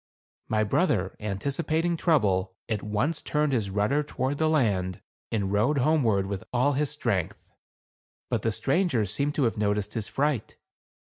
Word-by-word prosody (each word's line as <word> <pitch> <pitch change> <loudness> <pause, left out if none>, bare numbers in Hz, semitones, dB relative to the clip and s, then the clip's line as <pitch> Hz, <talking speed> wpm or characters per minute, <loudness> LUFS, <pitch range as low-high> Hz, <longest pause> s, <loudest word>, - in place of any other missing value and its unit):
My 110 0 +1
brother, 105 - +1
anticipating 150 - -1
trouble, 100 - +1
at 110 -3 -1
once 120 +10 -1
turned 150 -1 0
his 110 -6 0
rudder 105 +9 +1
toward 140 0 -2
land, 105 - +1 0.3
and 100 -3 -1
rowed 120 +9 +2
homeward 125 -9 +2
with 100 -1 -4
all 130 +4 +2
his 145 +1 0
strength. 115 - -2 0.8
But - - -1
the 115 - +1
strangers 130 - +1
seemed 145 +5 -1
to 145 - +1
have 115 -3 0
noticed 105 0 0
his 110 -2 -3
fright. 140 -5 -1
115 Hz, 145 wpm, -27 LUFS, 105-145 Hz, 0.8 s, rowed